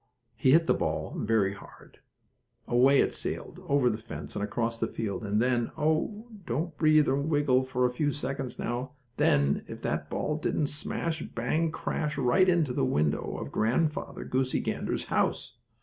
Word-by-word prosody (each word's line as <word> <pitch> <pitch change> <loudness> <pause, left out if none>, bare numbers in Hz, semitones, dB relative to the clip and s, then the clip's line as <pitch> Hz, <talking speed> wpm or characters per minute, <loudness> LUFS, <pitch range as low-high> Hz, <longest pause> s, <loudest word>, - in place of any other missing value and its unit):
He 130 - +4
hit 165 +1 +5
the - - +3
ball - - -2
very 105 -3 +1
hard. - - -15 0.7
Away 130 +3 +5
it - - 0
sailed, - - -5
over 140 -3 +3
the 110 -2 0
fence 80 -10 -8
and 100 - -2
across 115 +2 -2
the 115 - 0
field, 105 -4 -4
and 105 0 0
then, 120 -1 +1
oh, 160 +9 0 0.2
don't 155 +7 -2
breathe 155 -1 +4
or 135 - +2
wiggle 145 -4 +2
for 125 -1 0
a 125 - +2
few 145 +3 0
seconds 135 -2 -4
now! 125 +4 -3 0.2
then, 70 0 +3
if - - -8
that - - -2
ball 150 - -1
didn't 155 -1 0
smash, 160 +2 -2
bang, 155 +8 -1
crash 150 -1 -3
right 140 +9 +4
into 165 -7 +2
the - - 0
window 75 +2 0
of - - -6
Grandfather 150 +8 0
Goosey 130 0 0
Gander's - - -2
house! - - -1
130 Hz, 170 wpm, -28 LUFS, 115-150 Hz, 0.7 s, hit